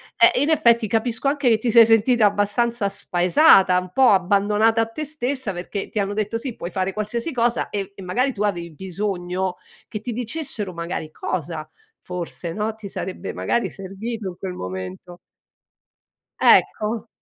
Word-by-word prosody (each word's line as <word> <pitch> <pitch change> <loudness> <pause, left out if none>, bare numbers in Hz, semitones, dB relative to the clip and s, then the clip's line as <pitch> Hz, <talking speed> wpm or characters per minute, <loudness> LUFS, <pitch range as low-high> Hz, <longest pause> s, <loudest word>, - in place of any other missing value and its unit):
Eh, 230 - +5
in 290 - +1
effetti 235 -7 +3
capisco 225 +4 -1
anche 280 -2 +2
che 225 - +4
ti 230 +1 -1
sei 230 0 +8
sentita 225 +1 +4
abbastanza 205 +2 0
spaesata, 185 - +4
un 180 0 -8
po' 260 +6 +5
abbandonata 205 +4 +3
a - - +2
te 225 +7 -6
stessa, 265 -7 -2
perché 185 +3 -5
ti - - -8
hanno 200 0 -1
detto: 215 +2 -2
"Sì, 245 -1 -5
puoi 175 - -6
fare 190 +1 -2
qualsiasi 230 +8 -2
cosa", 240 -1 0
e 200 -2 -3
e 195 - -11
magari 250 +9 0
tu 210 -1 -3
avevi 170 -5 -2
bisogno 185 +1 -3 0.3
che 215 - -5
ti 245 - -5
dicessero 235 - -2
magari 170 -2 -5
cosa, 160 -1 -4 0.3
forse, 175 -1 -6
no, 215 +3 -2
ti 220 -2 -9
sarebbe 190 -1 -5
magari, 235 - -1
servito 200 +3 -6
in 175 - -10
quel 190 -1 -5
momento. 95 - -7 1.2
Ecco. 220 +2 +3
210 Hz, 165 wpm, -22 LUFS, 185-235 Hz, 1.2 s, sei